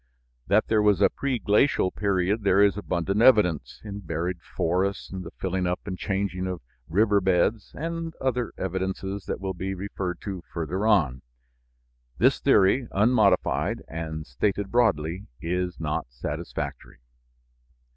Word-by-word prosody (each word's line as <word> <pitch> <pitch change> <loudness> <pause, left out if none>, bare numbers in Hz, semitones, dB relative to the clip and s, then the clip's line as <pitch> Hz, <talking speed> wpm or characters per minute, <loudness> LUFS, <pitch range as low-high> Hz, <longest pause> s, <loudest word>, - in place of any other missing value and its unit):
That 105 +2 +4
there 110 -1 +3
was 105 -3 +4
a - - +5
preglacial 120 -5 +2
period 100 +1 +1
there 100 -1 +4
is 100 -2 +4
abundant 100 0 -1
evidence, 90 - +4
in 100 -1 -6
buried 90 -1 -3
forests, 90 +4 -1
the 95 -2 -6
filling 95 -1 -2
up 90 +1 -1
and 95 - -4
changing 95 -1 -2
of 90 -2 -3 0.3
river 100 +3 +3
beds, 95 +3 +1
and 165 +1 -4
other 125 -2 -1
evidences 95 +1 -3
that - - -3
will 95 -1 -3
be 95 +2 -4
referred 90 -2 -4
to 95 -3 -5
further 90 +6 -2
on. 75 - +3 1.0
This - - +4
theory, 115 +6 +4
unmodified 105 -2 +2
and 80 -1 -5
stated 100 +9 -1
broadly, 90 -6 +1
is 90 +1 -2
not 75 -5 -2
satisfactory. - - -5
95 Hz, 135 wpm, -26 LUFS, 90-105 Hz, 1.0 s, a